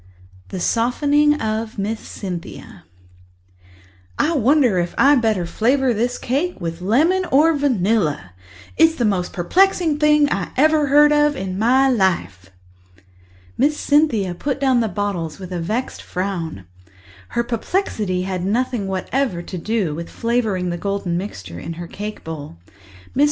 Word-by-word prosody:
The 185 - -5
Softening 290 - +2
of 220 0 -3
Miss 215 +3 -2
CynthiaToC 180 -4 -8 1.4
"I 335 - +1
wonder 260 -6 +3
if 175 0 -3
I'd 280 -2 +5
better 215 -6 +1
flavour 245 +8 +1
this 240 +3 -1
cake 290 - -2
with 165 -1 -5
lemon 310 - +2
or 310 +4 +4
vanilla. 200 - 0 0.4
It's 325 0 +5
the 240 - 0
most 190 -4 0
perplexing 330 - +2
thing 300 -1 +4
I 195 - -2
ever 305 +1 +3
heard 295 +2 +6
of 295 0 +3
in 190 -5 -4
my 260 +5 +4
life." 170 - 0 1.1
Miss 300 +2 +2
Cynthia 245 - +2
put 275 +10 -3
down 260 -3 +3
the 225 - +1
bottles 190 -7 -3
with 185 -2 -9
a 180 - -3
vexed 220 +10 -3
frown; 175 - -4 0.7
her 235 - +3
perplexity 225 - -2
had 185 -1 -3
nothing 225 +1 -1
whatever 190 0 -2
to 185 - -7
do 205 -3 -1
with 170 +2 -6
flavouring 220 -7 -1
the 175 - -4
golden 195 -3 -2
mixture 95 - -6
in 165 - -6
her 170 +1 -7
cake 210 +5 -7
bowl. 150 - -8 0.6
Mrs. - - -2
220 Hz, 145 wpm, -20 LUFS, 180-275 Hz, 1.4 s, heard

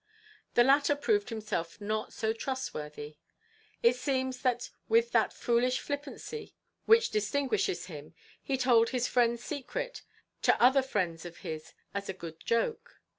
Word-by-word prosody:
The 240 - +7
latter 280 +2 +4
proved 410 +8 +1
himself 210 -7 -3
not 215 +1 -2
so 220 0 -1
trustworthy. 150 - -5 0.7
It 235 +1 +6
seems 260 0 -1
that 245 -2 0 0.2
with 460 +1 +4
that - - +3
foolish 245 +1 +1
flippancy 290 +10 -6 0.3
which 455 +1 +6
distinguishes 215 -3 0
him 155 -2 -10 0.3
he 270 - -1
told 240 -3 +4
his 250 -1 0
friend's 235 -1 +2
secret - - -4 0.4
to - - +4
other 260 +3 +6
friends 185 -11 -2
of 175 -1 -9
his 155 -1 -6 0.2
as 200 -1 -4
a - - -1
good 165 -3 -9
joke. 230 - -1
240 Hz, 140 wpm, -30 LUFS, 200-275 Hz, 0.7 s, The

